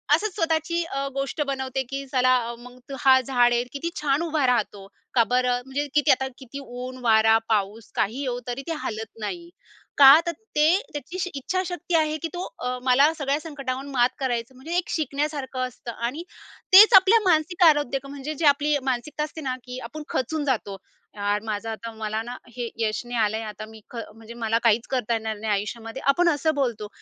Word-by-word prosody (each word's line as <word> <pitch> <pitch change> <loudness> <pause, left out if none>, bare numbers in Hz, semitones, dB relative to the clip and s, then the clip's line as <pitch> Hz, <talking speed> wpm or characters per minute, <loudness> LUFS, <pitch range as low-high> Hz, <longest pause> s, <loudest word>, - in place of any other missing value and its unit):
असंच 400 +4 -3
स्वतःची 330 -1 0
अ, 275 -4 -3
गोष्ट 275 +3 -2
बनवते 265 -1 -2
की 275 0 -4
चला, 255 0 +4 0.2
मग 250 +1 -13 0.2
हा 260 0 +6
झाड 245 -1 +3
आहे 240 0 +2
किती 285 +4 -3
छान 285 0 +1
उभा 310 -4 0
राहतो! 205 -5 0 0.3
का 235 - +5
बरं? 250 +1 +1
म्हणजे 280 +2 -3
किती 295 -2 +4
आता 265 +1 +2
किती 265 +2 -9
ऊन, 255 0 -7
वारा, 220 -1 +5
पाऊस 210 0 -1
काही 230 +7 -1
येवो 250 -3 -2
तरी 245 +2 -3
ते 330 - -1
हालत 220 0 -4
नाही. 340 +11 -5 0.5
का? 280 +2 +10
तर 340 - 0 0.2
ते 310 +4 +5 0.2
त्याची 355 +5 -4
इच्छाशक्ती 355 +4 -2
आहे 310 -1 +2
की - - 0
तो 355 +1 -4 0.2
अ, 250 0 -2
मला 275 +5 +4
सगळ्या 285 -1 -1
संकटावर 275 -4 -5
मात 245 -2 +3
करायचं 245 -2 -2
म्हणजे 285 +7 -7
एक 355 - -1
शिकण्यासारखं 280 -3 -2
असतं 245 -1 -9 0.2
आणि 295 +8 -5 0.5
तेच 430 +4 +10
आपल्या 385 +4 +7
मानसिक 335 +2 +2
आरोग्य 290 -4 +3
म्हणजे 285 +2 -6
जी 315 - -2
आपली 290 +1 +4
मानसिकता 270 +4 -2
असते 305 +1 -7
ना 260 -3 -2
की 250 0 -7
आपण 300 +7 -7
खचून 295 +4 -2
जातो. 220 -7 -1 0.4
यार, 205 0 -1
माझं 220 0 -4
आता, 230 +1 -6
मला 220 0 -3
ना 240 +1 -7 0.2
हे 240 -2 -3
यश 215 -2 0
नाही 240 0 -4
आलंय 215 +1 0
आता 210 +1 -8
मी 220 0 -14
ख - - -13 0.2
म्हणजे 225 +1 -11
मला 225 -1 0
काहीच 230 0 +3
करता 245 -3 0
येणार 220 -1 -2
नाही 215 +1 -3
आयुष्यामध्ये, 225 +4 -4
आपण 340 +5 +4
असं 315 0 +1
बोलतो. 235 -7 -1
265 Hz, 190 wpm, -24 LUFS, 235-300 Hz, 0.5 s, का